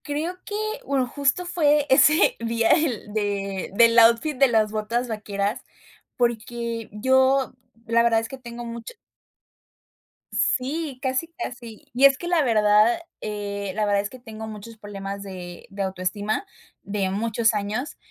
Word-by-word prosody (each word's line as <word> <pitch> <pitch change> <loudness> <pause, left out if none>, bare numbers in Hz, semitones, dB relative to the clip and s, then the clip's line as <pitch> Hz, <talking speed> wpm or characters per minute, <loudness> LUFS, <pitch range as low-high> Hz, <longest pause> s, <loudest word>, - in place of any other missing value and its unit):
Creo 310 +5 -3
que, 415 - -5 0.3
bueno, 270 -2 +1
justo 280 +7 0
fue 300 -4 +2
ese 300 +6 +5
día 230 0 0
del 245 - -1
de 200 -3 -2
del 230 +1 +6
outfit 235 +6 +4
de 275 +1 +5
las 220 -3 +2
botas 230 +3 -1
vaqueras, 205 -2 -3 0.5
porque 235 -1 -2
yo 260 +5 +2 0.3
la 230 0 +3
verdad 230 -1 +3
es 225 - -5
que 265 +3 -9
tengo 240 -1 -8
mucho 235 - -8 1.4
Sí, 280 +2 0
casi, 260 +4 -1
casi, 240 -9 -8
y 260 +3 +5
es 275 -1 +6
que 345 - -6
la 345 -3 +3
verdad 215 +1 +4 0.2
la 205 -1 -3
verdad 205 -1 +2
es 205 +1 -2
que 255 - -12
tengo 220 -2 -8
muchos 220 +1 -9
problemas 200 -1 -7
de 180 -3 -9
de 195 0 -6
autoestima 195 - -2 0.4
de 200 -2 -2
muchos 225 +3 +1
años, 215 +6 -3
230 Hz, 145 wpm, -24 LUFS, 210-260 Hz, 1.4 s, del